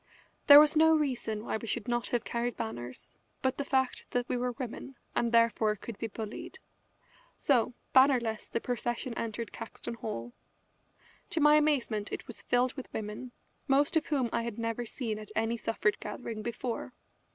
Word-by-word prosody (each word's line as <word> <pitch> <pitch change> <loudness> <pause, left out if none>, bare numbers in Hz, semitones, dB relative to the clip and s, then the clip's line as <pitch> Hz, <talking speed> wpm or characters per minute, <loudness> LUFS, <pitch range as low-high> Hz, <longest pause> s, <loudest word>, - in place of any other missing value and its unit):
There 285 0 +12
was 300 +1 +5
no 320 +1 +6
reason 240 -7 -2
why - - -1
we 230 - -8
should 230 +2 -2
not 240 0 0
have 240 - 0
carried 235 0 -2
banners 120 +2 -5 0.3
but 260 +1 0
the - - +1
fact 265 -2 0
that 245 0 -1
we - - -1
were 245 0 -1
women, 255 +2 -6 0.2
and 235 -1 +1
therefore 230 -2 +3
could 225 +2 -8
be 225 - -2
bullied. 220 0 -7 0.8
So, 245 -3 +2 0.2
bannerless, 250 -5 +4
the - - -2
procession 240 +1 -2
entered 230 0 -4
Caxton - - -7
Hall. 120 - -5 1.0
To 330 - -1
my 295 0 +6
amazement 275 -9 +2
it - - -5
was 235 - -9
filled 250 +1 +2
with 265 - -8
women, 215 +4 -5 0.4
most 280 +2 +3
of 320 0 +2
whom 275 -5 +1
I - - +1
had 230 -2 -4
never 230 +1 -2
seen 220 -3 -3
at 215 - -9
any 225 +1 +1
suffrage 225 -2 0
gathering 215 +1 -5
before. 235 +2 -4
235 Hz, 175 wpm, -30 LUFS, 220-260 Hz, 1.0 s, There